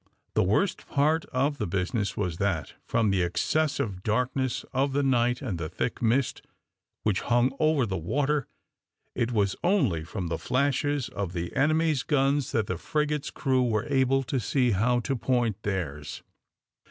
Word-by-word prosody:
The - - +3
worst 110 - +1
part 155 +3 +2
of 140 +3 -1
the - - -1
business 95 +4 -1
was 90 -5 -2
that, 95 -6 -1
from 110 -3 +2
the 95 -1 +2
excessive 105 - 0
darkness 125 +4 -1
of 135 +1 +1
the 145 +1 +1
night 125 -1 +2
and 100 -10 -3
the 80 -1 -3
thick 95 - -3
mist 120 +3 +1 0.6
which 105 -3 +1
hung 120 +2 +2
over 155 -4 +3
the 95 -4 -3
water, 140 - 0 0.7
it 120 0 -1
was 100 -4 +1
only 175 - +2
from 90 +3 -5
the 85 - -2
flashes 140 +1 0
of 100 -4 -4
the 85 0 -4
enemy's 155 0 +2
guns 140 -1 +1
that 110 -2 +1
the 95 -3 -3
frigate's 150 +2 -1
crew 130 -3 +1
were 110 -4 +1
able 135 0 +3
to 130 +1 -1
see 125 +1 +1
how 120 +5 +2
to 135 +2 -1
point 120 -4 0
theirs. 80 -8 -4
125 Hz, 165 wpm, -27 LUFS, 100-140 Hz, 0.7 s, The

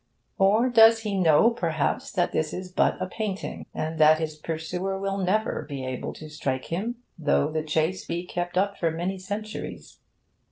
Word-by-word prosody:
Or 210 +6 +4
does 225 -2 +7
he 210 -3 -2
know 180 +4 +5
perhaps 165 -9 -1
that 175 -3 +1
this 155 -1 -1
is 185 0 -6
but - - +2
a - - -1
painting, 200 +1 -4
and 160 +1 -4
that 155 0 +7
his 155 -1 -3
pursuer 165 +5 -3
will 195 0 -2
never 195 -2 0
be 135 -2 -4
able 130 -1 -4
to 155 - -10
strike 135 -4 -3
him, 220 +8 -2 0.2
though 150 -1 +2
the 155 0 -1
chase 160 +4 0
be 170 +1 -3
kept 175 0 -3
up 200 +1 +1
for 165 - +2
many 175 +4 -3
centuries? 210 +3 -6
180 Hz, 175 wpm, -26 LUFS, 155-195 Hz, 0.2 s, does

